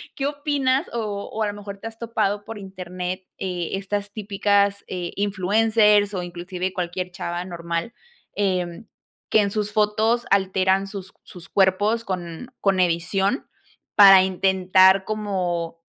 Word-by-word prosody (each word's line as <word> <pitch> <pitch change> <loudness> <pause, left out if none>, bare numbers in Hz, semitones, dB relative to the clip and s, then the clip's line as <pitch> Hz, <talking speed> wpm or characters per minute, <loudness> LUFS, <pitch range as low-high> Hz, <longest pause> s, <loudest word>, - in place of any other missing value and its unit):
¿qué 275 -1 -1
opinas? 285 -1 0
O 210 -3 -3
o 220 - -4
a - - 0
lo 205 - -3
mejor 200 -1 -9
te 225 - -6
has 225 0 -10
topado 210 -3 -1
por 225 - -7
internet, 185 -1 -6 0.2
eh, 180 -3 -3
estas 200 +1 -3
típicas, 200 -1 +1
eh, 175 -2 -5
influencers 205 +1 +3
o 185 - -2
inclusive 180 +1 -4
cualquier 180 0 -3
chava 175 0 -4
normal, 170 +3 -4 0.4
em, 185 0 -1 0.4
que 215 - +5
en 200 - 0
sus 210 0 -2
fotos 215 +3 +2
alteran 190 0 +2
sus 195 -1 -8
sus 180 +1 -11
cuerpos 205 +4 +2
con 180 +6 -6
con 195 -2 +2
edición 185 - +1 0.5
para 195 -2 +9
intentar 190 0 +4
como 180 -6 -2
195 Hz, 140 wpm, -23 LUFS, 180-210 Hz, 0.5 s, para